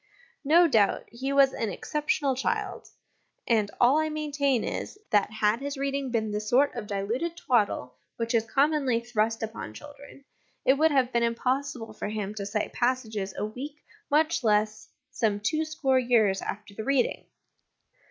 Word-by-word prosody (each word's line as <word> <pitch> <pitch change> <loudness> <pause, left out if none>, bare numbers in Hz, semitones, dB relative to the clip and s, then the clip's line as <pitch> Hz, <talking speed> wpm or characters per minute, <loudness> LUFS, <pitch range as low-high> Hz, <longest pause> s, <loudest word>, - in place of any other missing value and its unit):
No 335 +4 +6
doubt 220 -9 +3
he 260 +4 -3
was 275 -1 +5
an 225 - -2
exceptional 290 - -1
child; 265 - -2 0.6
and 215 -3 +2
all 255 +5 +5
I 315 0 0
maintain 290 -5 0
is, - - -4
that 205 -2 +3
had 215 +1 +1
his 280 +1 -4
reading 275 0 -2
been 220 -3 -1
the 210 - -1
sort 245 +7 +2
of 235 -4 -6
diluted 230 +13 -2
twaddle 205 - 0 0.2
which 230 +1 -2
is 230 -2 +3
commonly 275 -1 +2
thrust 225 -1 -1
upon 225 +1 -6
children, 285 -1 -13 0.4
it 265 - +6
would 310 +3 +3
have 265 -4 +1
been 235 - +2
impossible 240 0 -1
for - - -5
him 210 -1 -3
to 200 -2 -5
cite 210 +1 -2
passages 220 -6 -1
a - - -1
week, 260 +7 -7 0.3
much 315 +1 +2
less 215 0 +1 0.2
some 215 -3 0
two 310 +10 0
score 275 -4 +1
years, 225 -6 +2
after 210 0 -6
the 220 - -6
reading. 270 -1 0
245 Hz, 160 wpm, -27 LUFS, 215-280 Hz, 0.6 s, No